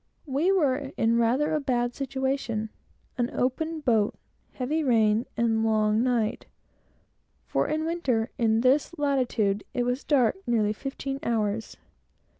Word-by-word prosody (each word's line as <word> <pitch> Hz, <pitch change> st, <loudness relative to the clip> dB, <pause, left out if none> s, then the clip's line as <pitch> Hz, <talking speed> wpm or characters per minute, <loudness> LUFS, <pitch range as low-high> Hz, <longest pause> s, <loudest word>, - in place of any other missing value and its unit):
We 295 Hz, +6 st, +1 dB
were 285 Hz, -7 st, +1 dB
in 230 Hz, +1 st, +2 dB
rather 250 Hz, +7 st, +2 dB
a 305 Hz, -, +2 dB
bad 245 Hz, -3 st, 0 dB
situation: 265 Hz, -5 st, -2 dB, 0.5 s
an 240 Hz, 0 st, +1 dB
open 315 Hz, +6 st, -1 dB
boat, 225 Hz, -7 st, +2 dB, 0.4 s
a -, -, -28 dB
heavy 300 Hz, +5 st, -1 dB
rain, 225 Hz, -3 st, +3 dB
and 235 Hz, -, +2 dB
a 225 Hz, 0 st, +1 dB
long 215 Hz, 0 st, +2 dB
night; 235 Hz, -4 st, 0 dB, 1.0 s
for -, -, 0 dB
in 310 Hz, +1 st, -1 dB
winter, 265 Hz, -9 st, -1 dB
in 225 Hz, -1 st, +3 dB
this 280 Hz, +7 st, +2 dB
latitude, 245 Hz, -8 st, 0 dB
it 245 Hz, -, +1 dB
was 245 Hz, +2 st, -1 dB
dark 265 Hz, 0 st, +2 dB
nearly 215 Hz, -3 st, +2 dB
fifteen 270 Hz, +3 st, -5 dB
hours. 220 Hz, -4 st, -2 dB
245 Hz, 140 wpm, -26 LUFS, 225-280 Hz, 1.0 s, rain